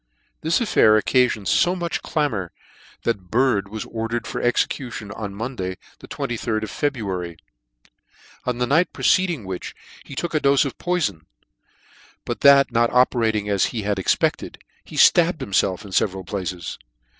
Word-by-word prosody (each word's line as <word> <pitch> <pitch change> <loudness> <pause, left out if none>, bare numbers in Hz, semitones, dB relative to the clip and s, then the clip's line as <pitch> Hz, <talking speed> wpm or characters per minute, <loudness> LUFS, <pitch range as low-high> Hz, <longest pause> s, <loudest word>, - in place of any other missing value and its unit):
This 160 +2 +1
affair 110 - +4
occafioned 120 -4 +1
fo 180 +1 +3
much 170 -2 -3
clamour 115 - -2 0.5
that 100 -6 -2
Bird 120 -4 +2
was 110 +2 -6
ordered 115 +1 -3
for - - -4
execution 120 -3 -1
on 100 -2 -6
Monday 100 -5 -4 0.2
the - - -12
2jd 110 -2 -3
of 110 - -5
February; 95 - -3 1.1
on 125 -1 -2
the 125 - +1
night 160 +7 +2
preceding 175 - +1
which 95 -1 -6 0.3
he 140 - -10
took 170 +5 -3
a 155 - +2
dofe 140 +1 +4
of 135 - -6
poifon; 150 - -1 1.0
but - - -4
that 140 -1 +6
not 115 0 +2
operating 115 -4 +2
as 100 -2 +2
he 115 -4 -4
had 100 -1 -1
expected, 95 - 0 0.3
he - - -12
ftabbed 175 0 +5
himfelf 100 -6 0
in 100 - -10
feveral 95 -1 0
places. 90 -3 -5
115 Hz, 150 wpm, -22 LUFS, 100-140 Hz, 1.1 s, that